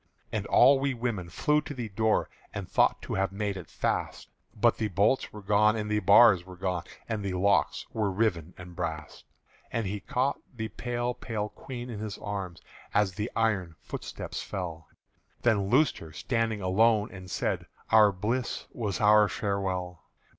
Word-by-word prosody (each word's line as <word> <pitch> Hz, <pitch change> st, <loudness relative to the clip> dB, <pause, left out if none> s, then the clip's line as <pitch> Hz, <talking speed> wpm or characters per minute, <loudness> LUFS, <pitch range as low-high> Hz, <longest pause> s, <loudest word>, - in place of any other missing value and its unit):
And -, -, -2 dB
all 135 Hz, 0 st, +6 dB
we 135 Hz, -1 st, 0 dB
women 115 Hz, -7 st, -3 dB
flew 150 Hz, -, +2 dB
to 145 Hz, -1 st, -8 dB
the 120 Hz, -3 st, -4 dB
door 110 Hz, +2 st, +1 dB, 0.3 s
And 100 Hz, -2 st, -4 dB
thought -, -, +2 dB
to -, -, -5 dB
have 95 Hz, 0 st, 0 dB
made 100 Hz, 0 st, -2 dB
it 95 Hz, -, -8 dB
fast; -, -, -2 dB, 0.3 s
But -, -, +3 dB
the 110 Hz, -, +1 dB
bolts 105 Hz, +7 st, +1 dB
were 105 Hz, -1 st, -10 dB
gone 105 Hz, +2 st, +4 dB
and 105 Hz, -1 st, -3 dB
the 105 Hz, -, +2 dB
bars 100 Hz, -1 st, +7 dB
were 90 Hz, 0 st, -11 dB
gone 90 Hz, -2 st, -2 dB, 0.2 s
And 110 Hz, -3 st, -3 dB
the 95 Hz, -2 st, -2 dB
locks 100 Hz, +2 st, +2 dB
were 110 Hz, -3 st, 0 dB
riven 95 Hz, -4 st, -1 dB
and 90 Hz, -1 st, -10 dB
brast. 80 Hz, -3 st, -5 dB, 0.5 s
And 115 Hz, -2 st, -1 dB
he 100 Hz, +2 st, -3 dB
caught 130 Hz, +7 st, -1 dB, 0.2 s
the 110 Hz, -1 st, -4 dB
pale 120 Hz, +1 st, -2 dB
pale 105 Hz, -3 st, -4 dB
Queen 125 Hz, 0 st, -8 dB
in 105 Hz, -, -6 dB
his 105 Hz, -1 st, -5 dB
arms 100 Hz, -4 st, -5 dB, 0.3 s
As 100 Hz, -2 st, +3 dB
the 105 Hz, +5 st, -3 dB
iron 100 Hz, -7 st, 0 dB
footsteps -, -, -6 dB
fell, 85 Hz, -4 st, -5 dB, 0.6 s
Then 105 Hz, -5 st, +2 dB
loosed 140 Hz, +4 st, +3 dB
her, 80 Hz, -, -10 dB
standing 115 Hz, -, -1 dB
alone, 105 Hz, +3 st, +3 dB
and 95 Hz, -2 st, -10 dB
said, -, -, -2 dB, 0.2 s
"Our 110 Hz, -2 st, +7 dB
bliss 110 Hz, +7 st, -2 dB
was 105 Hz, -6 st, -3 dB
our 105 Hz, 0 st, +6 dB
farewell!" 95 Hz, -4 st, -2 dB
105 Hz, 175 wpm, -28 LUFS, 95-115 Hz, 0.6 s, bars